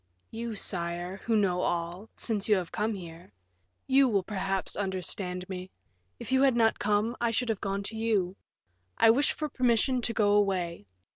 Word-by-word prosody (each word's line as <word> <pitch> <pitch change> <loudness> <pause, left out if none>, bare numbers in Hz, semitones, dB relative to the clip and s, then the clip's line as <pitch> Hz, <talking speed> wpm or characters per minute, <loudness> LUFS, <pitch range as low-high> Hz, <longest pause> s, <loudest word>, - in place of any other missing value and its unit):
"You, 230 0 -4
sire, 175 -1 0
who 225 +2 -1
know 180 -3 +1
all, 175 +5 -2
since 215 -2 -2
you 210 - +6
have 180 -3 -3
come 215 +1 -1
here; 170 - -10 0.5
you 270 0 +5
will, 200 -4 +1
perhaps, 195 -1 -2
understand 185 -1 -3
me. 185 -1 -6 0.5
If - - -5
you 265 0 +4
had 270 -3 +4
not 225 -1 +3
come, 210 +3 +1
I 235 - +2
should 235 +1 -1
have 220 -3 -1
gone 200 0 -2
to 220 - -6
you. 210 -5 0 0.6
I 225 - +7
wish 280 +6 +2
for 305 - -3
permission 250 -1 +1
to 235 - 0
go 210 -3 +2
away. 185 - +1
205 Hz, 180 wpm, -29 LUFS, 185-230 Hz, 0.6 s, I